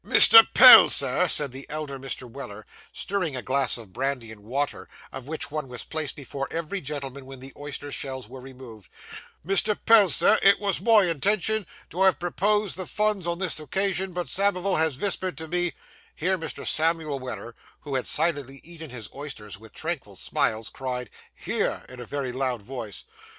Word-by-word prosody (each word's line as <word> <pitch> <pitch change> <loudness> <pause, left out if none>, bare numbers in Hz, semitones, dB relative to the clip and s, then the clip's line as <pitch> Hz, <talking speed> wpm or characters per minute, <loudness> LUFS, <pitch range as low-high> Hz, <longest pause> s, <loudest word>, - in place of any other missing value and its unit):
'Mr. 455 0 +9
Pell, - - +10
Sir,' - - +5
said 145 -3 +2
the 135 +2 -8
elder 150 -3 -6
Mr. 130 -1 -5
Weller, 115 -4 -10 0.3
stirring 185 -8 -2
a 125 - -6
glass 135 -2 +2
of 110 -6 -12
brandy 130 -3 -3
and 110 -2 -13
water, 135 +7 -4 0.2
of 135 -1 -9
which 155 -1 -3
one 150 -2 -4
was 125 -1 -7
placed 155 -3 -4
before 135 -1 -6
every 165 +4 -4
gentleman 140 -2 -6
when 135 -1 -11
the 135 +1 -11
oyster 145 0 -7
shells 130 -2 -5
were 130 - -11
removed 125 -6 -13 0.6
'Mr. 195 +3 +1
Pell, 220 -4 +6
Sir, 215 - +5
it 200 0 +5
wos 200 -4 -1
my 220 0 +5
intention 200 +5 +1 0.2
to 180 - -5
have 190 -1 +4
proposed 205 +3 -1
the 185 - -6
funs 210 -4 -1
on 170 0 -2
this 180 -3 -1
occasion, 190 +3 0
but 175 0 -5
Samivel 195 -1 0
has 160 -3 +2
vispered 185 -3 -2
to 160 +1 -5
me 175 0 -1 0.2
' - - -28
Here 185 +4 0
Mr. 165 -3 -7
Samuel 160 -3 0
Weller, 125 -2 -8 0.3
who 145 - -8
had 130 -1 -2
silently 145 -4 -1
eaten 165 -1 -10
his 120 -4 -8
oysters 120 -8 -7
with 110 0 -15
tranquil 155 - -5
smiles, 115 -3 -1
cried, 125 -4 -6 0.3
'Hear!' - - -3
in 125 0 -12
a 120 - -8
very 140 0 -4
loud 125 -3 -3
voice. 115 -4 -8
145 Hz, 180 wpm, -24 LUFS, 130-180 Hz, 0.6 s, Pell